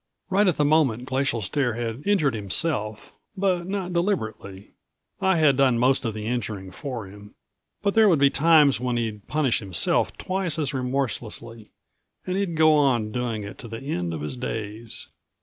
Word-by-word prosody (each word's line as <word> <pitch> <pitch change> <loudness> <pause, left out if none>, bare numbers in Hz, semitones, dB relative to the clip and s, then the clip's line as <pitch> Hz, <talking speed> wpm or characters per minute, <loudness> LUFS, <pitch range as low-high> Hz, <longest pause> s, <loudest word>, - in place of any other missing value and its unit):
Right 200 +2 +4
at 180 - +2
the 150 - +3
moment 140 -6 +2
Glacial 130 -3 -1
Stare 120 +4 0
had 120 +1 -4
injured 165 -10 +3
himself, 105 - -2 0.2
but 185 -3 0
not 190 -2 -3
deliberately. 110 - -2 0.5
I 190 -2 +3
had 150 -4 +4
done 130 -3 +4
most 130 +2 +2
of 110 -2 -2
the 105 -1 -5
injuring 110 -5 -3
for 120 +2 -6
him. 100 +2 -13 0.5
But 200 -1 +1
there 220 -2 +6
would 170 - +4
be 140 0 +4
times 150 -3 +5
when 125 -1 -1
he'd 110 -3 -4
punish 150 -6 +1
himself 95 -5 0
twice 185 -4 -2
as 145 -4 -1
remorselessly, 120 -4 -3 0.6
and 185 - -2
he'd 195 -4 -1
go 155 0 +5
on 130 -8 +2
doing 115 -3 -2
it 100 - -9
to 120 - -8
the 115 0 -6
end 90 - -3
of 80 -2 -5
his 75 - -4
days. 110 -2 -4
125 Hz, 175 wpm, -24 LUFS, 110-155 Hz, 0.6 s, there